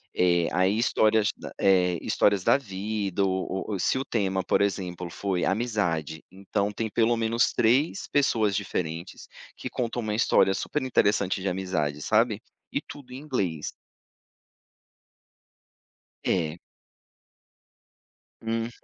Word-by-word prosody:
Eh, 85 Hz, -2 st, +3 dB
aí 95 Hz, +4 st, +2 dB
histórias, 110 Hz, -2 st, +3 dB, 0.3 s
eh, 90 Hz, -3 st, +3 dB
histórias 100 Hz, -2 st, +2 dB
da -, -, +5 dB
vida, 100 Hz, -3 st, -2 dB
ou 95 Hz, 0 st, -2 dB
ou 100 Hz, -3 st, -2 dB
se -, -, +1 dB
o 135 Hz, -, -3 dB
tema 95 Hz, -4 st, 0 dB
por -, -, +2 dB
exemplo 90 Hz, -3 st, -2 dB
foi 95 Hz, -1 st, -2 dB
amizade, 95 Hz, -, -1 dB
então 100 Hz, +2 st, -2 dB
tem 110 Hz, +2 st, -3 dB
pelo 115 Hz, +2 st, +2 dB
menos 115 Hz, +1 st, +2 dB
3 130 Hz, +10 st, +2 dB
pessoas 110 Hz, -8 st, +2 dB
diferentes, 85 Hz, -3 st, -4 dB, 0.3 s
que -, -, -5 dB
contam 120 Hz, 0 st, -2 dB
uma 105 Hz, -1 st, -2 dB
história 95 Hz, -4 st, +4 dB
super 150 Hz, +9 st, -2 dB
interessante 100 Hz, -6 st, +1 dB
de 100 Hz, -, -2 dB
amizade, 80 Hz, -6 st, -2 dB
sabe, 110 Hz, +2 st, +2 dB, 0.3 s
e -, -, +1 dB
tudo 135 Hz, -3 st, -12 dB
em -, -, -6 dB
inglês. 100 Hz, -, -2 dB, 2.5 s
É. 80 Hz, -2 st, 0 dB, 1.8 s
Uhum. 115 Hz, +1 st, -2 dB
100 Hz, 120 wpm, -26 LUFS, 90-115 Hz, 2.5 s, da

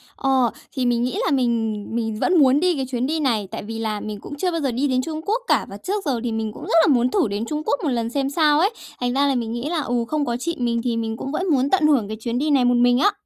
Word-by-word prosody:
Ờ, 265 Hz, -4 st, +2 dB, 0.2 s
thì 260 Hz, -, -1 dB
mình 240 Hz, -1 st, +1 dB
nghĩ 255 Hz, +11 st, -2 dB
là -, -, +1 dB
mình 230 Hz, -5 st, 0 dB
mình 225 Hz, -2 st, -1 dB
vẫn 360 Hz, +6 st, +2 dB
muốn 270 Hz, 0 st, +5 dB
đi 360 Hz, +1 st, +2 dB
cái 270 Hz, -2 st, -2 dB
chuyến 255 Hz, 0 st, -2 dB
đi 315 Hz, +2 st, -1 dB
này, 230 Hz, -9 st, 0 dB
tại 225 Hz, -, -5 dB
vì 225 Hz, +2 st, -6 dB
là 215 Hz, -2 st, -2 dB
mình 210 Hz, -1 st, -6 dB
cũng 290 Hz, -, -8 dB
chưa 360 Hz, +4 st, 0 dB
bao 330 Hz, -1 st, -2 dB
giờ 275 Hz, -3 st, 0 dB
đi 260 Hz, +5 st, 0 dB
đến 255 Hz, -1 st, +1 dB
Trung 315 Hz, +3 st, -5 dB
Quốc 445 Hz, +5 st, 0 dB
cả, -, -, +2 dB
và -, -, -8 dB
trước 400 Hz, +1 st, -3 dB
giờ 265 Hz, -5 st, 0 dB
thì 240 Hz, -, -2 dB
mình 220 Hz, -1 st, -2 dB
cũng -, -, -10 dB
rất -, -, -3 dB
là -, -, +3 dB
muốn 245 Hz, 0 st, +2 dB
thử 375 Hz, -, +2 dB
đến 205 Hz, +2 st, -3 dB
Trung 300 Hz, +4 st, -3 dB
Quốc 285 Hz, -, 0 dB
một 305 Hz, -, +1 dB
lần 235 Hz, -3 st, -1 dB
xem 275 Hz, +2 st, -1 dB
sao 300 Hz, 0 st, +3 dB
ấy. 380 Hz, +5 st, +4 dB, 0.3 s
Thành 245 Hz, 0 st, -1 dB
ra 280 Hz, +2 st, +2 dB
là 275 Hz, -, +1 dB
mình 230 Hz, -2 st, -2 dB
nghĩ 240 Hz, +5 st, -3 dB
là, 335 Hz, -2 st, 0 dB
ừ, 245 Hz, -3 st, -1 dB
không 300 Hz, +1 st, -1 dB
có 235 Hz, -2 st, -1 dB
chị 335 Hz, +7 st, -3 dB
mình 235 Hz, -1 st, 0 dB
thì 240 Hz, -2 st, -1 dB
mình 225 Hz, -1 st, -3 dB
cũng 270 Hz, -, -5 dB
vẫn 370 Hz, +5 st, -2 dB
muốn 270 Hz, -1 st, +2 dB
tận 360 Hz, -4 st, +3 dB
hưởng 265 Hz, -9 st, +2 dB
cái 220 Hz, +1 st, -5 dB
chuyến 235 Hz, +1 st, -3 dB
đi 305 Hz, +3 st, 0 dB
này 270 Hz, -4 st, +3 dB
một 245 Hz, 0 st, +3 dB
mình 245 Hz, +1 st, +4 dB
á. 410 Hz, -, +4 dB
255 Hz, 315 wpm, -22 LUFS, 235-300 Hz, 0.3 s, muốn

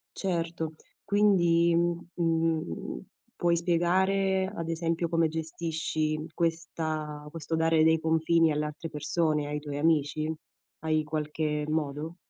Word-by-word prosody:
Certo. 165 Hz, -3 st, -2 dB, 0.3 s
Quindi, 175 Hz, -5 st, +4 dB
mhmm, 170 Hz, 0 st, +1 dB
mhmm, 165 Hz, -, -1 dB, 0.4 s
puoi 170 Hz, -1 st, +2 dB
spiegare, 190 Hz, +3 st, +2 dB
ad 165 Hz, -3 st, -4 dB
esempio, 165 Hz, 0 st, 0 dB
come 165 Hz, -1 st, +2 dB
gestisci 160 Hz, -1 st, -2 dB
questa 160 Hz, -3 st, -2 dB
questo 160 Hz, 0 st, -3 dB
dare 160 Hz, -1 st, +3 dB
dei 160 Hz, 0 st, +4 dB
confini 160 Hz, 0 st, +3 dB
alle 150 Hz, 0 st, 0 dB
altre 155 Hz, +2 st, -6 dB
persone, 150 Hz, 0 st, 0 dB
ai 150 Hz, 0 st, -2 dB
tuoi 145 Hz, -1 st, -5 dB
amici? 155 Hz, 0 st, +1 dB, 0.5 s
Hai 155 Hz, -1 st, +1 dB
qualche 150 Hz, 0 st, -2 dB
modo? 155 Hz, +2 st, -2 dB
160 Hz, 115 wpm, -28 LUFS, 155-170 Hz, 0.5 s, Quindi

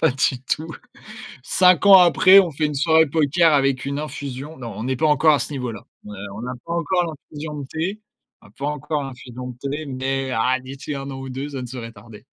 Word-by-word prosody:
pas 160 Hz, -, +4 dB
du 130 Hz, -1 st, 0 dB
tout. 150 Hz, +3 st, -2 dB, 0.8 s
5 180 Hz, +4 st, +4 dB
ans 195 Hz, -1 st, +10 dB
après, 185 Hz, +2 st, +7 dB
on 180 Hz, -, -1 dB
fait 155 Hz, +1 st, -1 dB
une 150 Hz, -, -4 dB
soirée 160 Hz, +2 st, +4 dB
poker 160 Hz, +3 st, +3 dB
avec 135 Hz, -2 st, +2 dB
une 140 Hz, +1 st, -3 dB
infusion. 145 Hz, 0 st, -6 dB
Non, 120 Hz, -3 st, -7 dB
on 115 Hz, +5 st, -5 dB
est 130 Hz, -, 0 dB
pas 155 Hz, +4 st, +1 dB
encore 150 Hz, +1 st, +4 dB
à -, -, +2 dB
ce 130 Hz, -, -4 dB
niveau 125 Hz, -4 st, -3 dB
là. 110 Hz, -, -9 dB, 0.2 s
Heu, -, -, -9 dB, 0.2 s
on 105 Hz, -, -7 dB
n'a 125 Hz, -, -4 dB
pas 170 Hz, -, -4 dB
encore 175 Hz, +1 st, 0 dB
l'infusion 150 Hz, -1 st, -8 dB
de 140 Hz, -, -7 dB
thé, 175 Hz, +9 st, -4 dB, 0.4 s
on -, -, -17 dB
n'a 105 Hz, -, -20 dB
pas 140 Hz, -, -3 dB
encore 150 Hz, 0 st, -2 dB
l'infusion 125 Hz, -1 st, -8 dB
de 125 Hz, -, -9 dB
thé, 150 Hz, +3 st, -4 dB
mais 135 Hz, 0 st, -2 dB
ah, 125 Hz, +2 st, +1 dB
d'ici 135 Hz, +3 st, -7 dB
1 135 Hz, 0 st, -6 dB
an 135 Hz, -1 st, -7 dB
ou 135 Hz, -, -7 dB
2 135 Hz, +3 st, -5 dB
ça 135 Hz, -3 st, -5 dB
ne -, -, -5 dB
saurait 120 Hz, -2 st, -8 dB
tarder. 105 Hz, 0 st, -14 dB
140 Hz, 235 wpm, -22 LUFS, 130-155 Hz, 0.8 s, ans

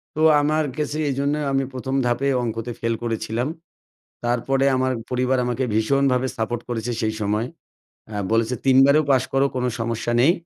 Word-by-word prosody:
তো -, -, -4 dB, 0.2 s
আমার 155 Hz, +1 st, +1 dB
কেসে 150 Hz, 0 st, -2 dB
এইজন্য 140 Hz, +2 st, 0 dB, 0.2 s
আমি 135 Hz, 0 st, +1 dB
১ম 130 Hz, +1 st, -3 dB
ধাপে 120 Hz, +3 st, +1 dB
অঙ্কতে 115 Hz, 0 st, -3 dB
ফেল 115 Hz, 0 st, 0 dB
করেছিলাম। 115 Hz, +2 st, -2 dB, 0.8 s
তারপরে 130 Hz, +3 st, +1 dB
আমার 130 Hz, 0 st, +1 dB, 0.2 s
পরিবার 125 Hz, +1 st, +1 dB
আমাকে 125 Hz, +2 st, -1 dB
ভীষণভাবে 130 Hz, +3 st, +2 dB
সাপোর্ট 115 Hz, +1 st, -2 dB
করেছে 120 Hz, 0 st, -2 dB
সেই 110 Hz, 0 st, 0 dB
সময়। 105 Hz, +3 st, 0 dB, 0.7 s
আ -, -, -10 dB, 0.2 s
বলেছে 115 Hz, +2 st, +2 dB
৩ 130 Hz, -1 st, +5 dB
বারেও 150 Hz, +2 st, +4 dB
পাশ 130 Hz, -2 st, +4 dB
করো 135 Hz, +1 st, +3 dB
কোনো 125 Hz, 0 st, 0 dB
সমস্যা 115 Hz, +1 st, -2 dB
নেই, 155 Hz, +7 st, +6 dB
125 Hz, 160 wpm, -22 LUFS, 115-135 Hz, 0.8 s, নেই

